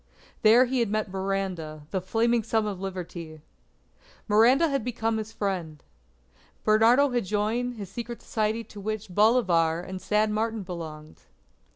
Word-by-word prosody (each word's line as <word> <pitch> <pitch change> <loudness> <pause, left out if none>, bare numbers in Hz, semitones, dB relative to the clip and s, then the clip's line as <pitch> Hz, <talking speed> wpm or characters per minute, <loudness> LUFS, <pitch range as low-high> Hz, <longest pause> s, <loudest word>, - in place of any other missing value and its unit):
There 230 +4 +6
he 255 +1 -1
had 230 -3 +1
met 215 -2 -1
Miranda 190 -5 -3
the 190 - -1
Flaming 230 +5 +1
Son 220 0 0
of 200 -3 -4
Liberty. 175 -4 -6 0.9
Miranda 235 +9 +5
had 275 -5 -1
become 225 -2 -1
his 215 0 -6
friend. 175 -9 -4 0.8
Bernardo 230 +6 +4
had 240 -4 0
joined 220 +5 -1
his 200 -4 -8
secret 235 +1 -6
society 220 +1 -1
to 210 - -12
which 215 0 -4
Bolivar 180 -7 +3
and 185 +1 -7
San 210 0 +1
Martin 220 0 -1
belonged. 160 -4 -8
215 Hz, 145 wpm, -26 LUFS, 185-230 Hz, 0.9 s, There